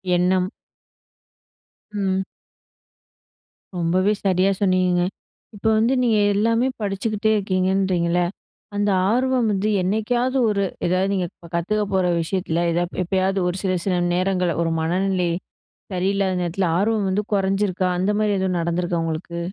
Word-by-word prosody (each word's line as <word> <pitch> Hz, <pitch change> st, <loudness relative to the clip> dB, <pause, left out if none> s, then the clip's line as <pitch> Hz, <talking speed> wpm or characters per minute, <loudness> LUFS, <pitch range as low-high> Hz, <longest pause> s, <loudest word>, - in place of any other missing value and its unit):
எண்ணம். 180 Hz, +1 st, +1 dB, 1.4 s
ம். 190 Hz, -2 st, 0 dB, 1.5 s
ரொம்பவே 185 Hz, +4 st, +2 dB
சரியா 190 Hz, 0 st, +3 dB
சொன்னீங்கங்க. 185 Hz, -2 st, +2 dB, 0.5 s
இப்ப 205 Hz, -, -13 dB
வந்து 230 Hz, +4 st, +3 dB
நீங்க 230 Hz, -3 st, +3 dB, 0.2 s
எல்லாமே 230 Hz, +4 st, +2 dB
படிச்சுக்கிட்டே 210 Hz, +2 st, -1 dB
இருக்கீங்கன்றிங்கல்ல. 185 Hz, -2 st, +1 dB, 0.5 s
அந்த 205 Hz, 0 st, +1 dB, 0.2 s
ஆர்வம் 255 Hz, 0 st, +2 dB
வந்து 205 Hz, +1 st, 0 dB
என்னைக்காவது 240 Hz, +7 st, 0 dB
ஒரு, 200 Hz, -1 st, +1 dB, 0.2 s
ஏதாவது 185 Hz, +2 st, +1 dB
நீங்க 185 Hz, -2 st, 0 dB, 0.3 s
கத்துக்க 210 Hz, +5 st, 0 dB
போற 190 Hz, -1 st, +2 dB, 0.2 s
விஷயத்துல, 170 Hz, -1 st, -2 dB
ஏதாது 175 Hz, +1 st, -2 dB
எப்பயாவது 190 Hz, +2 st, 0 dB
ஒரு 180 Hz, -, -1 dB
சில 190 Hz, -1 st, +1 dB
சில 190 Hz, -2 st, +1 dB, 0.2 s
நேரங்கள்ல 180 Hz, -2 st, 0 dB
ஒரு 165 Hz, -, 0 dB
மனநிலை 180 Hz, +2 st, 0 dB, 0.6 s
சரியில்லாத 190 Hz, 0 st, 0 dB
நேரத்துல 175 Hz, +2 st, -1 dB
ஆர்வம் 210 Hz, +1 st, +1 dB
வந்து 200 Hz, +3 st, 0 dB
குறைஞ்சிருக்கா? 195 Hz, -1 st, +1 dB
அந்த 190 Hz, +3 st, +1 dB
மாரி 210 Hz, -1 st, +2 dB
எதுவும் 190 Hz, -1 st, 0 dB
நடந்துருக்கா 170 Hz, 0 st, -1 dB
உங்களுக்கு? 165 Hz, +1 st, -4 dB
190 Hz, 120 wpm, -22 LUFS, 180-205 Hz, 1.5 s, சரியா